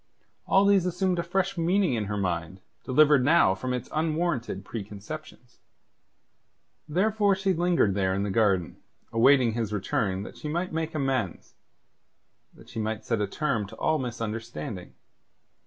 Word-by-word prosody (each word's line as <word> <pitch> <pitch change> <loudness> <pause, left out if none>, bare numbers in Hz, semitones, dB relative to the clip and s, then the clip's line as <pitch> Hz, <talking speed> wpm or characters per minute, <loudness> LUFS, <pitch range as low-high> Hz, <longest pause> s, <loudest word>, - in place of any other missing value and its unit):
All 195 +1 +4
these 195 -3 +4
assumed 180 0 0
a - - +2
fresh 190 +1 -1
meaning 180 -2 +2
in 110 -3 -1
her 105 +1 -3
mind, 90 -1 -3 0.2
delivered 145 0 +4
now 150 - +5
from 125 +7 -4
its 125 -1 -3
unwarranted 155 - -1
preconceptions. 120 +5 -8 1.3
Therefore 205 +4 +2
she 195 0 0
lingered 170 - +2
there 95 -1 0
in 100 - -1
the 100 - -2
garden, 95 -5 +1 0.4
awaiting 125 0 +5
his 115 -2 -2
return 100 -2 -1
that - - -10
she - - -6
might 170 +3 -2
make 160 0 -3
amends; 130 - -2 1.0
that - - -17
she - - -7
might 110 0 -3
set 115 -3 0
a 105 - 0
term 120 -3 -1
to - - -11
all 155 -1 +1
misunderstanding. 115 -7 -5
125 Hz, 150 wpm, -27 LUFS, 105-170 Hz, 1.3 s, now